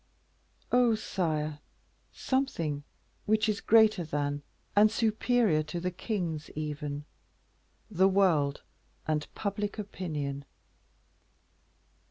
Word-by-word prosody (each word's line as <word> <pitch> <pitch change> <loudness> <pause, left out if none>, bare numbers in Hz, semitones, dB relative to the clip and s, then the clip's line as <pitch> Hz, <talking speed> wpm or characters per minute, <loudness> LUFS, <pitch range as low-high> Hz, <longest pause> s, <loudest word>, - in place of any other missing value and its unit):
"Oh! 245 -2 +5
sire, 155 -8 -2 0.5
something 170 - -1 0.4
which 215 +1 +3
is 210 -2 0
greater 220 -4 +5
than 145 -2 -2 0.3
and 210 +1 +7
superior 220 -5 +2
to 165 +3 -4
the 180 +1 -2
kings 175 -5 -3
even 150 -1 -4 0.8
the 190 -2 +3
world 165 -8 +2 0.4
and 150 -1 0
public 205 0 -2
opinion. 150 -9 -4
180 Hz, 90 wpm, -30 LUFS, 150-215 Hz, 0.8 s, and